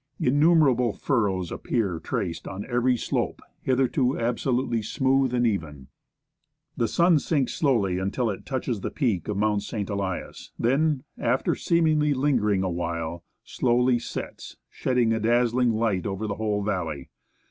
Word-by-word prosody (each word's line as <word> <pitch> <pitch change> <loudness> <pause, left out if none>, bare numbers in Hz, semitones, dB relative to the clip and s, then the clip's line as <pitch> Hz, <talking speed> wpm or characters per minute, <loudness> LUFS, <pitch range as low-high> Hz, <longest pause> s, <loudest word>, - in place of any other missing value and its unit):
Innumerable 140 -5 +4
furrows 95 -8 0
appear 100 -9 -1
traced 85 - -3
on 95 +2 -6
every, 125 0 +1
slope, - - -2 0.2
hitherto 130 0 +1
absolutely 120 0 0
smooth 135 +3 +1
and 120 -1 +1
even. 75 - -3 0.9
The 115 - +1
sun 170 +2 +4
sinks 140 -3 0
slowly 105 - +1
until 105 +5 -1
it 95 - -7
touches 125 -5 -3
the - - -2
peak 115 - -1
of 105 - -2
Mount 105 0 +1
St. 105 -1 -4
Elias, 100 -2 -4
then, 140 +3 +1 0.2
after 125 +3 +1
seemingly 155 -3 +2
lingering 115 -8 +1
a 95 - -1
while, 85 -1 -3 0.2
slowly 125 0 +2
sets, - - -7
shedding 125 -3 +1
a 110 - 0
dazzling 120 +2 +2
light 110 -5 0
over 100 +2 -3
the 105 - -2
whole 105 -2 -1
valley. 85 -9 -3
115 Hz, 140 wpm, -25 LUFS, 100-130 Hz, 0.9 s, Innumerable